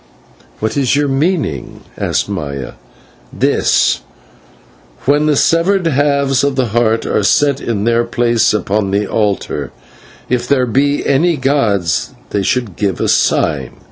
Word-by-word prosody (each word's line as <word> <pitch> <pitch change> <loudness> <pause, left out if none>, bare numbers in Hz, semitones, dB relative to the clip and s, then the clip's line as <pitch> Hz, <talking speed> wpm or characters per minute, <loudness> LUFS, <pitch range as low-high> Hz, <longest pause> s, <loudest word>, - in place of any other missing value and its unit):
"What 110 +5 -2
is 135 -1 +2
your 145 0 +1
meaning?" 140 - -2
asked - - -1
Maya. 70 -10 -5 0.6
"This: - - +1 1.0
When 145 +3 +2
the 150 - +3
severed 175 +5 +2
halves 140 -3 +1
of 140 -1 0
the 130 -3 0
Heart 115 0 +1
are - - 0
set 140 +6 +2
in 105 -4 -2
their 115 +1 +2
place 120 0 +1
upon 105 -1 -1
the 100 +2 0
altar, 105 -1 -2 0.6
if 125 -1 -1
there 130 -3 +2
be 140 +4 0
any 160 +4 +2
gods 105 - 0 0.2
they 100 - 0
should 110 -1 -1
give 100 -5 -1
a - - 0
sign. - - +1
125 Hz, 140 wpm, -15 LUFS, 105-140 Hz, 1.0 s, the